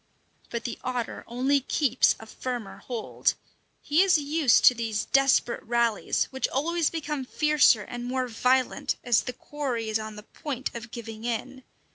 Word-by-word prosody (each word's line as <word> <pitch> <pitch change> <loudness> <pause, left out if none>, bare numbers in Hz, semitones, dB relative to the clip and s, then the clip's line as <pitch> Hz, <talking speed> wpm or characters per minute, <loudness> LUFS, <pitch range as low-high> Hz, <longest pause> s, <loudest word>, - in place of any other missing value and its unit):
But 235 0 -4
the 240 -3 -5
otter 245 -2 -3
only 260 +4 +1
keeps 260 -1 +2
a 220 - -10
firmer 240 -1 -5
hold. 240 -3 -2 0.5
He 300 +4 +3
is 380 -3 +5
used 295 -3 +3
to - - +9
these 225 -3 -2
desperate 270 -3 +3
rallies, 235 -2 +1
which 265 0 -1
always 330 +4 0
become 300 -4 -3
fiercer 295 -5 +3
and 240 +4 -7
more 255 +1 -1
violent 250 +2 +1
as 240 -3 +3
the 250 - -5
quarry 250 -6 -4
is 215 0 +1
on 215 0 -6
the 210 - -10
point 265 +2 -5
of 235 0 -7
giving 225 -1 -8
in. 250 +3 -4
250 Hz, 160 wpm, -27 LUFS, 230-280 Hz, 0.5 s, to